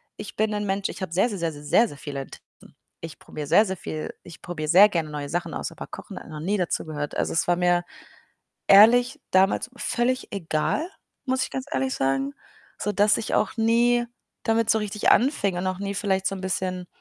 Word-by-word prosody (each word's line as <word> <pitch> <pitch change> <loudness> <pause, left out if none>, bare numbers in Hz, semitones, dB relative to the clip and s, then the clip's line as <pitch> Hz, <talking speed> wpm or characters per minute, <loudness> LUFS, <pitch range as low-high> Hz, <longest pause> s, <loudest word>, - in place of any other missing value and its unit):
Ich - - -9
bin 215 0 0
'n 210 0 -2
Mensch, 195 0 -1
ich - - -8
habe 185 -3 -4
sehr, 190 +6 +3
sehr, 205 - -4
sehr, 165 -1 -1
sehr, 145 -1 -11
sehr, 225 +10 +4
sehr 145 - -11
viele 140 -2 -5
Interessen, - - -15 0.3
ich 165 -1 -8
probiere 150 -2 -7
sehr, 210 +8 +5
sehr 190 -1 -4
viel. 155 -2 -5
Ich 170 - -13
probiere 160 -4 -5
sehr 195 +6 +8
gerne 165 -5 -2
neue 145 -1 -5
Sachen 170 -1 -3
aus, - - -4
aber - - -9
Kochen - - -9
hat - - -13
noch 155 - -7
nie 195 +7 -1
dazugehört. 155 -5 -3
Also, - - -1
es 165 - +1
war 175 - +3
mir 175 0 +2 0.8
ehrlich 230 +5 +6
damals 190 +6 +2
völlig 250 +1 -1
egal, 195 - -1 0.4
muss 260 -1 0
ich - - -8
ganz 265 +1 -4
ehrlich 265 -3 0
sagen, 135 +1 0 0.4
sodass 210 0 +2
ich 225 - -3
auch - - 0
nie 240 +2 +3 0.4
damit 225 0 +1
so 220 - +4
richtig 210 -1 0
anfing 230 - +3
und 185 - -2
auch 185 -1 -2
nie 200 0 -3
vielleicht 195 -1 0
so 195 - 0
'n 190 - -7
bisschen 185 -1 -3
190 Hz, 210 wpm, -25 LUFS, 165-220 Hz, 0.8 s, sehr